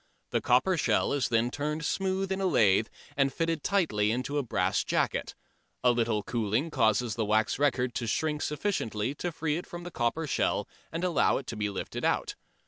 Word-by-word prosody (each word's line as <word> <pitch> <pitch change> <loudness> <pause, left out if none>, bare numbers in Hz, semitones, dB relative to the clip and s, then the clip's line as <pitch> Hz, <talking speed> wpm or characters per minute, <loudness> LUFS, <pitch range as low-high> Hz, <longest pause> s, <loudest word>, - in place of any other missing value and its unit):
The - - +1
copper 150 +10 +3
shell - - +2
is 140 -2 0
then 115 +1 +2
turned 150 +3 -2
smooth 190 +1 -1
in 190 0 -1
a 190 - +2
lathe 110 - +4 0.3
and 135 -1 +2
fitted 165 0 -1
tightly 155 - +2
into 130 +5 -1
a - - -1
brass 120 - 0
jacket. - - -1 0.5
A 125 - +6
little 115 -3 0
cooling 115 +8 -1
causes 110 0 +2
the 110 - -1
wax 110 +3 +1
record 130 -4 +1
to 115 - -3
shrink 150 +6 0
sufficiently 140 - -1
to 175 +4 -3
free 160 -1 -1
it 175 - -6
from 175 0 -7
the 175 - -7
copper 130 +5 -1
shell 150 - 0 0.2
and 165 +2 -3
allow 180 -4 +3
it 135 - -6
to 115 - -5
be 105 -1 -1
lifted 100 - -5
out. - - +1
135 Hz, 195 wpm, -29 LUFS, 115-165 Hz, 0.5 s, A